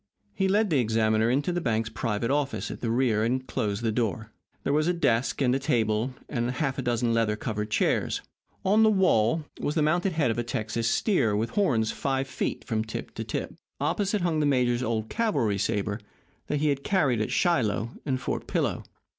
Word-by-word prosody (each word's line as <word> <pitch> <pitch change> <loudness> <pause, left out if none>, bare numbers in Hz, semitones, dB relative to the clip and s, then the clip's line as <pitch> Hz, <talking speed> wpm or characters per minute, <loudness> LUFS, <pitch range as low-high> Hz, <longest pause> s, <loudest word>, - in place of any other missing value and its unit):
He 190 - +1
led 205 0 +2
the 145 - +4
examiner 110 -1 +2
into 140 +7 +1
the 175 0 -1
bank's 115 -5 0
private 115 0 -1
office 145 -1 -1
at - - -8
the 115 - -1
rear, 115 -3 +2
and 130 +3 0
closed 105 -2 -2
the 115 - +1
door. 110 -1 -2 0.3
There 140 - 0
was 155 +2 +2
a 180 - +3
desk, 135 -5 +1
and 125 -1 +3
a 135 - +1
table, 115 -1 0
and 120 -3 -1
half 130 +1 -1
a - - 0
dozen 120 -1 0
leather 115 -2 +2
covered 105 0 -3
chairs. - - +1 0.4
On 205 +3 +4
the 220 - +6
wall 160 - +3
was 145 - -2
the 155 - +3
mounted 175 +4 +1
head 150 -7 +2
of 115 - -2
a - - 0
Texas 115 0 -2
steer 115 - +2
with 110 +3 -1
horns 120 - +2
five 135 -1 -1
feet - - -3
from 110 -2 -1
tip 110 - -6
to - - -4
tip. - - -4 0.3
Opposite 205 0 0
hung 170 -3 +1
the 150 - +2
major's 125 -3 +2
old 110 -3 -1
cavalry 135 - 0
saber 100 +1 -1 0.5
that 150 -1 -1
he 150 - +3
had 140 -1 -1
carried 140 - +2
at 110 - -1
Shiloh 115 - +1
and 130 -3 -1
Fort - - -3
Pillow. - - -1
125 Hz, 205 wpm, -27 LUFS, 110-150 Hz, 0.5 s, the